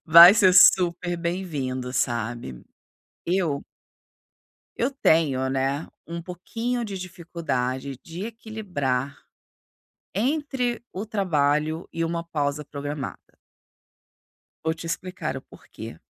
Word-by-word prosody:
vai 170 Hz, +3 st, +11 dB
ser 190 Hz, -4 st, +6 dB
super 175 Hz, -1 st, +6 dB
bem-vindo, 150 Hz, -8 st, -3 dB
sabe? 120 Hz, -, -2 dB, 0.6 s
Eu 170 Hz, -6 st, 0 dB, 1.1 s
eu 240 Hz, +4 st, +1 dB
tenho, 155 Hz, -, +2 dB
né, 135 Hz, +3 st, 0 dB, 0.4 s
pouquinho 230 Hz, +7 st, -3 dB
de 200 Hz, -3 st, -5 dB
dificuldade 140 Hz, -7 st, -3 dB
de 175 Hz, +6 st, -6 dB
equilibrar 180 Hz, -, -3 dB, 1.0 s
entre 255 Hz, -, 0 dB
o 195 Hz, -, -4 dB
trabalho 155 Hz, -6 st, +1 dB
e 165 Hz, -, -1 dB
uma 170 Hz, 0 st, -2 dB
pausa 150 Hz, -2 st, -2 dB
programada. 145 Hz, -1 st, -5 dB, 1.5 s
Vou 160 Hz, 0 st, +1 dB
te 165 Hz, -, -8 dB
explicar 180 Hz, +2 st, -3 dB
o -, -, -5 dB
porquê. -, -, -11 dB
165 Hz, 95 wpm, -25 LUFS, 140-190 Hz, 1.5 s, vai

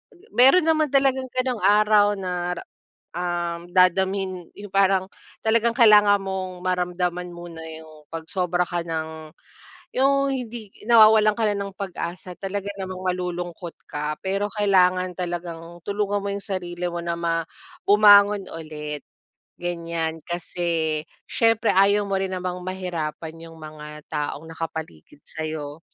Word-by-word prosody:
ge 405 Hz, +6 st, -23 dB
meron 270 Hz, +9 st, +6 dB
naman 315 Hz, -1 st, +3 dB
talagang 270 Hz, -1 st, +2 dB
ganong 255 Hz, -2 st, -1 dB
araw 210 Hz, 0 st, +5 dB
na 180 Hz, -2 st, -2 dB
re -, -, -7 dB, 0.5 s
uhm, 175 Hz, 0 st, -3 dB
dadamhin 185 Hz, 0 st, +2 dB
yung 205 Hz, -1 st, -10 dB
parang, 195 Hz, -1 st, +3 dB, 0.4 s
talagang 230 Hz, +1 st, +3 dB
kailangan 210 Hz, -4 st, +7 dB
mong, 190 Hz, -2 st, -4 dB
maramdaman 180 Hz, -1 st, -1 dB
muna 170 Hz, -1 st, -9 dB, 0.2 s
yung 155 Hz, -1 st, -14 dB
pag 165 Hz, -1 st, -6 dB
sobra 180 Hz, 0 st, 0 dB
ka 175 Hz, -1 st, -2 dB
ng 160 Hz, -1 st, -5 dB, 0.7 s
yung 275 Hz, +1 st, +3 dB
hindi 240 Hz, -5 st, -5 dB, 0.2 s
nawawalan 215 Hz, -2 st, +7 dB
ka 230 Hz, -, -3 dB
na 205 Hz, -, -2 dB
ng 200 Hz, -1 st, -5 dB
pag-asa. 180 Hz, -2 st, -6 dB
Talaga 200 Hz, +1 st, -3 dB
namang 185 Hz, -1 st, -5 dB
malulungkot 180 Hz, -1 st, -3 dB, 0.2 s
ka, 150 Hz, +1 st, -2 dB
pero 195 Hz, +2 st, 0 dB
kailangan 185 Hz, -3 st, +2 dB
talagang 175 Hz, -1 st, -5 dB
tulungan 205 Hz, +1 st, -1 dB
mo 200 Hz, -, -2 dB
yung 200 Hz, -1 st, -4 dB
sarili 180 Hz, -2 st, -3 dB
mo 175 Hz, 0 st, -3 dB
na 170 Hz, 0 st, -2 dB
ma 165 Hz, -1 st, 0 dB, 0.4 s
bumangon 205 Hz, -1 st, +6 dB
ulit, 150 Hz, -2 st, -6 dB, 0.6 s
ganyan. 170 Hz, -2 st, -3 dB
Kasi, 170 Hz, -2 st, -1 dB, 0.3 s
siyempre 225 Hz, -1 st, +2 dB
ayaw 200 Hz, +2 st, +4 dB
mo 195 Hz, -, -2 dB
rin 190 Hz, -1 st, -1 dB
namang 180 Hz, 0 st, -3 dB
mahirapan 170 Hz, -4 st, -4 dB
yung 165 Hz, -, -13 dB
mga 150 Hz, -1 st, -10 dB
taong 150 Hz, 0 st, -3 dB
nakapaligid 160 Hz, -, -7 dB
sa'yo, 155 Hz, -1 st, -4 dB
180 Hz, 135 wpm, -24 LUFS, 170-205 Hz, 0.7 s, kailangan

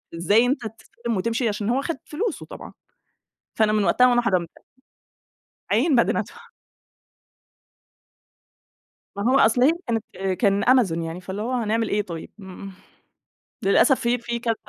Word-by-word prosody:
إزاي 205 Hz, +8 st, +3 dB
أنت 265 Hz, +2 st, 0 dB
تسلِّم 230 Hz, 0 st, -6 dB
وتمشي؟ 230 Hz, +5 st, -1 dB
عشان 205 Hz, 0 st, -3 dB
هو 255 Hz, +3 st, +1 dB
خد 330 Hz, +3 st, -3 dB
فلوسه 380 Hz, +4 st, -4 dB
طبعًا. -, -, -11 dB, 0.8 s
فأنا 220 Hz, -1 st, +2 dB
من 210 Hz, -1 st, +2 dB
وقتها 250 Hz, +5 st, +4 dB
وأنا 240 Hz, -1 st, +3 dB
حرّمت. 185 Hz, -7 st, 0 dB, 1.2 s
أعاين، 265 Hz, +9 st, +3 dB
بعدين 235 Hz, -, +2 dB
أدفع 470 Hz, 0 st, -6 dB, 2.7 s
ما 200 Hz, -, -3 dB
هو 270 Hz, -, +5 dB
أصل، 235 Hz, 0 st, +3 dB
هي 270 Hz, -, +6 dB, 0.2 s
كانت 225 Hz, -2 st, -1 dB, 0.4 s
كان 200 Hz, -2 st, +2 dB
أمازون، 225 Hz, -10 st, +3 dB
يعني 165 Hz, +2 st, -6 dB
فاللي 190 Hz, +3 st, -6 dB
هو، 240 Hz, +3 st, -3 dB
هنعمل 225 Hz, -2 st, 0 dB
إيه 210 Hz, -, 0 dB
طيب؟ 170 Hz, -5 st, -8 dB
إمم. 190 Hz, 0 st, -10 dB, 0.9 s
للأسف 225 Hz, +7 st, +4 dB
في 240 Hz, +1 st, +1 dB
في 235 Hz, 0 st, -4 dB
كذا 230 Hz, -1 st, -1 dB
225 Hz, 145 wpm, -23 LUFS, 200-245 Hz, 2.7 s, هي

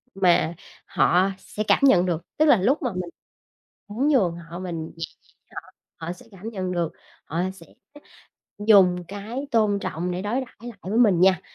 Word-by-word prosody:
mà 175 Hz, -3 st, +3 dB, 0.3 s
họ 185 Hz, +2 st, +3 dB
sẽ 215 Hz, -, -5 dB
cảm -, -, +4 dB
nhận 185 Hz, -10 st, +6 dB
được. 170 Hz, -2 st, -1 dB, 0.2 s
Tức 310 Hz, -, +4 dB
là 285 Hz, -, +6 dB
lúc 270 Hz, -, +2 dB
mà 250 Hz, -, -1 dB
mình 180 Hz, -1 st, -4 dB, 0.8 s
muốn 235 Hz, +8 st, -1 dB
nhường 190 Hz, -, +3 dB
họ 170 Hz, +1 st, -9 dB
mình 170 Hz, -3 st, -4 dB
nhẹ 165 Hz, -, -3 dB, 0.2 s
nhàng -, -, -31 dB
với -, -, -20 dB
họ, -, -, -20 dB, 0.4 s
họ 170 Hz, -, -2 dB
sẽ 245 Hz, -, -16 dB
cảm 200 Hz, +3 st, -8 dB
nhận 185 Hz, -4 st, -4 dB
được, 170 Hz, -2 st, -1 dB, 0.3 s
họ 165 Hz, +3 st, -2 dB
sẽ 170 Hz, -3 st, -15 dB, 0.9 s
dùng 190 Hz, -4 st, +5 dB
cái 220 Hz, +8 st, -6 dB
tôn 215 Hz, -4 st, +2 dB
trọng 180 Hz, -1 st, -3 dB
để 180 Hz, +1 st, -3 dB
đối 210 Hz, +3 st, -2 dB
đãi 260 Hz, -, -10 dB
lại 235 Hz, -3 st, -9 dB
với 210 Hz, +6 st, -1 dB
mình 200 Hz, -8 st, +4 dB
nha. 185 Hz, -1 st, +5 dB
190 Hz, 190 wpm, -24 LUFS, 175-220 Hz, 0.9 s, nhận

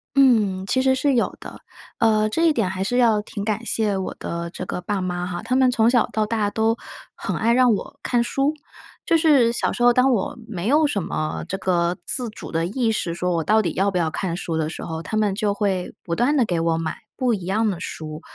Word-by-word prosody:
嗯， 215 Hz, -9 st, +3 dB
其 260 Hz, +6 st, +1 dB
实 265 Hz, 0 st, +3 dB
是 280 Hz, +1 st, +1 dB
有 240 Hz, -, +1 dB
的。 -, -, -10 dB, 0.4 s
呃， 215 Hz, -1 st, +3 dB
这 325 Hz, +10 st, 0 dB
一 315 Hz, -, +4 dB
点 220 Hz, -8 st, 0 dB
还 190 Hz, 0 st, -3 dB
是 245 Hz, +6 st, -1 dB
要 225 Hz, -4 st, +4 dB
挺 205 Hz, -1 st, -6 dB
感 215 Hz, +1 st, -1 dB
谢 215 Hz, -3 st, 0 dB
我 190 Hz, -, -4 dB
的 170 Hz, 0 st, -4 dB
这 185 Hz, -, -7 dB
个 180 Hz, -, -4 dB
爸 200 Hz, +1 st, -2 dB
妈 180 Hz, -1 st, -2 dB
哈， 175 Hz, -1 st, -4 dB
他 255 Hz, -, -1 dB
们 260 Hz, -1 st, +4 dB
从 230 Hz, -2 st, +3 dB
小 240 Hz, -2 st, +3 dB
到 215 Hz, -1 st, 0 dB
大 210 Hz, -1 st, 0 dB
都 220 Hz, +2 st, +1 dB, 0.4 s
很 -, -, -3 dB
爱 230 Hz, +2 st, +2 dB
让 250 Hz, -2 st, +5 dB
我 275 Hz, +7 st, -5 dB
看 240 Hz, -1 st, +1 dB
书。 275 Hz, +5 st, 0 dB, 0.5 s
就 330 Hz, -, +3 dB
是 285 Hz, -7 st, +4 dB
小 -, -, 0 dB
时 -, -, -5 dB
候 245 Hz, -, +7 dB
当 255 Hz, +2 st, +3 dB
我 225 Hz, -6 st, -1 dB
没 200 Hz, -3 st, -4 dB
有 300 Hz, +4 st, +4 dB
什 210 Hz, -9 st, 0 dB
么 155 Hz, -2 st, -3 dB
这 195 Hz, -, -2 dB
个 175 Hz, -2 st, 0 dB
自 245 Hz, -3 st, 0 dB
主 215 Hz, -, -10 dB
的 165 Hz, 0 st, 0 dB
意 230 Hz, +2 st, 0 dB
识 170 Hz, -6 st, -2 dB
说 180 Hz, +1 st, -1 dB
我 165 Hz, -, 0 dB
到 215 Hz, +7 st, +3 dB
底 220 Hz, -, 0 dB
要 195 Hz, +2 st, +1 dB
不 190 Hz, -, -2 dB
要 165 Hz, -2 st, +1 dB
看 170 Hz, 0 st, -3 dB
书 170 Hz, -3 st, -3 dB
的 155 Hz, -1 st, -1 dB
时 -, -, -7 dB
候， 160 Hz, 0 st, -5 dB
他 190 Hz, -, -4 dB
们 210 Hz, -2 st, +2 dB
就 205 Hz, -1 st, 0 dB
会 195 Hz, -3 st, -1 dB
不 170 Hz, -, -2 dB
断 255 Hz, -, +2 dB
地 260 Hz, -, +4 dB
给 175 Hz, -4 st, -1 dB
我 165 Hz, 0 st, +1 dB
买 165 Hz, 0 st, -3 dB, 0.2 s
不 250 Hz, -3 st, +1 dB
一 190 Hz, -5 st, -4 dB
样 215 Hz, +4 st, +1 dB
的 175 Hz, -, -6 dB
书。 155 Hz, -3 st, -6 dB
210 Hz, 265 characters per minute, -22 LUFS, 180-240 Hz, 0.5 s, 候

